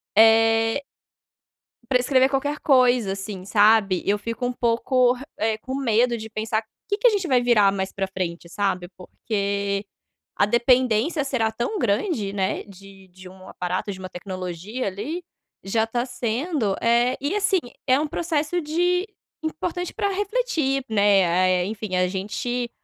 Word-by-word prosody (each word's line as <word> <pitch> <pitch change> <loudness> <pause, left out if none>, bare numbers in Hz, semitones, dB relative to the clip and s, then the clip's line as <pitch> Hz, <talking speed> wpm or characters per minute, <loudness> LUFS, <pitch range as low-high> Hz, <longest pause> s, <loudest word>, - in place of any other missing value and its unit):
É 225 +3 +5 1.1
Pra 255 -2 +4
escrever 260 +1 +3
qualquer 285 +2 -1
coisa, 250 -6 +3
assim, 195 -1 -7
sabe, 205 -2 +4
eu 205 +1 +2
fico 230 +4 -4
um 250 - -1
pouco 245 +1 +2
re 255 +1 -9
eh, 220 0 0
com 260 +4 -6
medo 240 -2 +2
de 220 0 -8
pensar: 220 0 -2 0.2
"Que 405 - 0
que 450 - +4
a - - +8
gente 400 -5 -1
vai 255 -4 +3
virar 220 -5 +4
mais 190 -1 -3
pra 195 -1 -3
frente?", 175 -3 -4
sabe, 190 -2 -1
porque 200 0 -2 0.5
a - - +4
dependência 245 +5 +2
será 255 -5 0
tão 240 - -3
grande, 215 - 0
né, 190 -1 -1
de 195 -1 -15
de 185 +1 -13
um 185 0 -14
aparato, 180 +3 -3
de 190 - -8
uma 185 0 -7
tecnologia, 185 +5 -5
ali, 235 - -4 0.4
já 220 +3 +1
tá 240 +2 -1
sendo, 245 - -1
eh, 235 +2 +3
e 290 +8 -1
assim, 405 -2 +2 0.3
é 260 +1 +4
um 305 - -1
processo 320 +1 -1
de 355 +4 +1 0.4
importante 355 +3 -3
pra 405 - -1
refletir, 385 - -1
né, 200 -3 +4
ah, 180 +2 +2
eh, 180 -1 +2
enfim, 215 -2 -4
a 180 0 +2
gente 215 +6 -3
225 Hz, 160 wpm, -23 LUFS, 200-270 Hz, 1.1 s, a